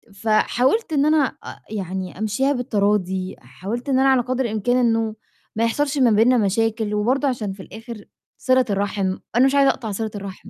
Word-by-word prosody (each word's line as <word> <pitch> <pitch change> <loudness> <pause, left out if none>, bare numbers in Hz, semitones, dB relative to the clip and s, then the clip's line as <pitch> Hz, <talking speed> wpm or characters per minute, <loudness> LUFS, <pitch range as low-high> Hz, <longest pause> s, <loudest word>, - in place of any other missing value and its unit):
فحاولت 245 - +1
إن 285 0 +2
أنا 305 -2 +4 0.2
أ - - -8
يعني 190 -2 -5
أمشيها 240 +7 0
بالتراضي 200 -6 -1
حاولت 195 - -6
إن 260 -1 +2
أنا 270 0 +4
على 260 -2 +4
قدْر 255 +1 -2
الإمكان 225 +3 0
إنه 225 -2 +1 0.4
ما 225 - 0
يحصلش 290 +5 -1
ما 245 -3 +4
بينّا 230 +4 +4
مشاكل، 220 +1 0
وبرضه 255 +7 +1
عشان 215 -7 -2
في 190 -1 -11
الآخر 225 0 -10 0.3
صِلة 255 -1 +2
الرحم، 200 -1 -1 0.2
أنا 255 +2 +5
مش 270 +1 +2
عايزة 275 -1 +5
أقطع 220 -5 -6
صِلة 220 +2 -3
الرحم. 200 +1 -8
225 Hz, 175 wpm, -21 LUFS, 205-255 Hz, 0.4 s, أنا